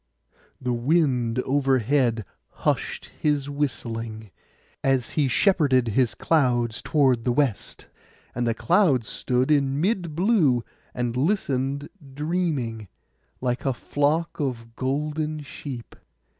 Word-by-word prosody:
The 125 -1 -1
Wind 125 -3 +1
overhead 130 -4 +2 0.4
hushed - - -1
his 145 -2 0
whistling, 115 -7 -3 0.5
as 135 -2 +1
he 150 -3 +1
shepherded 130 - +3
his 120 +2 +1
clouds 120 -7 +1
toward 130 -6 +2
the 125 - +1
west; 125 -5 -1 0.5
and 120 0 -1
the 115 - +1
clouds 125 - +3
stood 125 +3 0
in 140 -1 +2
mid 175 -3 0
blue, 165 - +3 0.3
and 120 -1 -1
listened 140 -3 0 0.3
dreaming, 145 - -2 0.5
like 125 -1 -1
a 135 -3 0
flock 150 +6 0
of 115 -5 -3
golden 150 +3 -2
sheep. 130 -3 -8
135 Hz, 110 wpm, -25 LUFS, 120-150 Hz, 0.5 s, shepherded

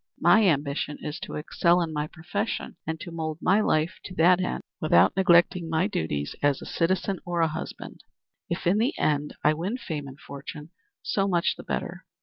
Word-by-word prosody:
My 220 -2 +5
ambition 145 -2 0
is 150 - -4
to - - -7
excel 170 +3 +2
in 165 -2 -2
my 150 0 -2
profession, 170 +8 -4
and 160 0 -3
to 175 - -7
mould 160 -2 -3
my 195 +4 +3
life 160 -2 +1
to 185 - -8
that 180 +2 +5
end 180 - -2 0.2
without 155 - +4
neglecting 175 -2 +4
my 160 +3 +2
duties 75 - -2
as 145 -1 +2
a - - -9
citizen 185 +2 0
or 175 -1 -1
a 165 - +4
husband. 155 - -7 0.5
If, 170 - -3
in 185 +5 +3
the 240 +6 +1
end, 150 -1 0
I 150 - +5
win 180 +10 -3
fame 155 - -5
and 135 +1 -11
fortune, 150 +2 -9 0.3
so 195 -1 0
much 175 -2 +2
the - - -9
better. - - -4
165 Hz, 190 wpm, -26 LUFS, 150-185 Hz, 0.5 s, My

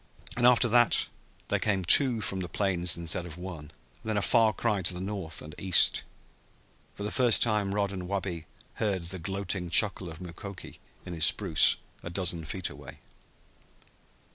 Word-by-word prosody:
And 120 0 +3
after 125 0 +4
that 120 +1 +3 0.4
there - - 0
came 95 -4 -1
two 120 +3 +5
from 95 -2 -3
the 90 -1 -6
plains 90 -4 0
instead 85 +1 -2
of 80 -1 -11
one, 90 -4 -8
and - - -16 0.3
then 110 -1 -2
a - - 0
far 115 -1 +3
cry 105 -2 -2
to 90 0 +3
the - - -6
north 95 -5 -3
and 75 +1 -11
east. 95 -2 +3 0.9
For 100 - -8
the 105 - -3
first 125 -4 +5
time 105 -3 -1
Rod 100 -1 -1
and 90 -2 -7
Wabi 90 -4 -4 0.4
heard 100 -5 -1
the 90 +2 -2
gloating 95 0 -4
chuckle 95 -1 +3
of 80 0 -10
Mukoki 90 +2 -10 0.3
in 90 - -7
his 80 -1 +2
spruce 90 -2 +4 0.3
a - - -8
dozen 85 -2 -1
feet 90 +3 -5
away. - - -12
95 Hz, 175 wpm, -27 LUFS, 85-105 Hz, 0.9 s, two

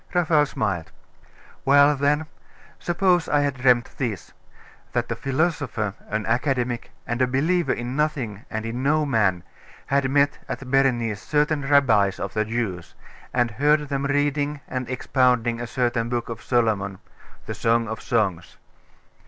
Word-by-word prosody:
Raphael 160 -4 +3
smiled. 95 -10 -2 0.7
'Well 145 +1 +5
then.... 145 +3 +1 0.5
Suppose 175 -1 +1
I 145 - +3
had 145 -1 0
dreamt 125 -2 +2
this. 115 -9 -3 0.6
That - - -1
a - - 0
philosopher, 135 - -1 0.2
an 110 0 -2
academic, 120 0 -1 0.2
and 120 +2 -2
a 130 - +4
believer 160 +7 +1
in 120 +2 -4
nothing 135 -9 -2
and 110 -1 -4
in 115 +2 -4
no 150 +3 +2
man, 105 - +1 0.4
had 140 -1 +1
met 145 +1 +2
at 135 -2 -5
Berenice 120 -6 +2
certain 150 -1 0
rabbis 110 -9 +4
of 95 - -4
the 110 0 0
Jews, 110 -7 -4 0.4
and 120 -2 +1
heard 150 +4 +2
them 140 -1 -1
reading 145 0 0
and 130 -2 -4
expounding 125 -2 +1
a 120 - -4
certain 120 -1 -1
book 120 -1 -2
of 115 -1 -6
Solomon 105 -6 0 0.5
the - - -4
Song 115 0 +1
of 110 0 -5
Songs. 100 -8 -1
125 Hz, 145 wpm, -24 LUFS, 115-145 Hz, 0.7 s, Well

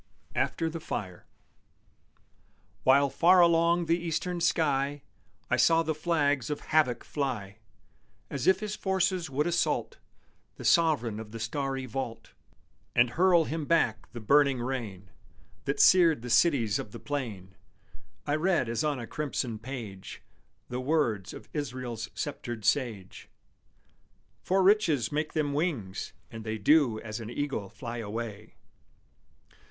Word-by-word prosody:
AFTER 165 - 0
THE 165 +1 -4
FIRE 95 - -6 1.5
While 140 +1 +4
far 180 +2 +5
along 170 0 +4
the 165 +1 +1
eastern 175 +1 -2
sky 145 -4 +1 0.4
I - - +1
saw 165 0 +4
the 160 0 -1
flags 145 -6 0
of 150 - -3
Havoc 140 -7 +1
fly, 115 -8 -4 0.7
As 140 -3 -4
if 190 +1 +4
his 210 0 -3
forces 185 -3 0
would 140 +3 0
assault 175 0 -1 0.6
The - - -9
sovereign 145 - +3
of 110 -1 -8
the 115 +1 -8
starry 135 +3 -3
vault 120 -1 -5 0.6
And 120 -1 +4
hurl 175 +1 +4
Him 160 0 -3
back 120 -9 +1
the 120 - -7
burning 140 +3 +3
rain 115 -7 -5 0.5
That 140 0 -2
seared 165 -8 +6
the 125 - -5
cities 120 -6 +3
of 105 - -7
the - - -7
plain, 110 -10 -5 0.7
I 145 +1 +1
read 170 -7 +1
as 115 -1 -1
on 150 -2 0
a 120 - -5
crimson 125 -4 -3
page 115 -6 -8 0.4
The 125 +1 -4
words 125 - 0
of - - -11
Israel's 125 -6 -4
sceptred 120 -7 -5
sage: 115 -9 -1 1.1
_For 190 0 +2
riches 170 - +3
make 150 +1 -2
them 145 -2 0
wings, 140 - -2 0.2
and 115 -1 -8
they 110 0 -3
Do 120 0 +3
as 110 0 -6
an 115 -1 -7
eagle 120 -6 -3
fly 120 +2 -7
away. 110 -1 -6
135 Hz, 135 wpm, -29 LUFS, 115-160 Hz, 1.5 s, seared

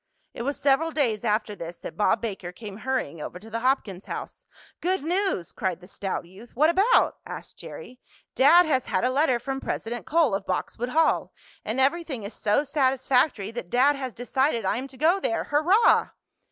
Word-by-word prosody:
It - - -6
was 280 +4 -2
several 285 +4 +3
days 250 -9 0
after 210 -1 0
this 170 -2 -8
that - - -8
Bob 210 - +2
Baker 195 -6 -5
came 205 +1 -9
hurrying 230 - -3
over 175 - -6
to 220 +4 -13
the 230 - -2
Hopkins 230 -7 0
house. - - -7 0.3
"Good 365 -3 0
news!" 355 - -1
cried 185 -3 -2
the 180 - -15
stout 195 -2 -4
youth. 195 +7 -15
"What 305 +6 +4
about?" 395 +8 +3
asked - - -9
Jerry. 255 - -10 0.3
"Dad 335 +7 +6
has 265 -5 0
had - - 0
a 250 - +2
letter 270 -2 +2
from 270 +3 -4
President 235 +1 -4
Cole, 310 -7 +3
of 195 0 -2
Boxwood 230 +6 -2
Hall, 320 +5 +2 0.3
and 225 +4 -2
everything 275 -3 0
is 200 - -7
so 210 +7 +1
satisfactory 260 -5 +1
that 230 -7 -7
dad 270 +6 +4
has 260 -4 -5
decided 245 -1 0
I 190 - +1
am 260 +2 -4
to 265 -1 -15
go 335 +7 +3
there. 340 -3 -1
Hurrah!" 345 +10 +4
255 Hz, 190 wpm, -25 LUFS, 210-295 Hz, 0.3 s, Dad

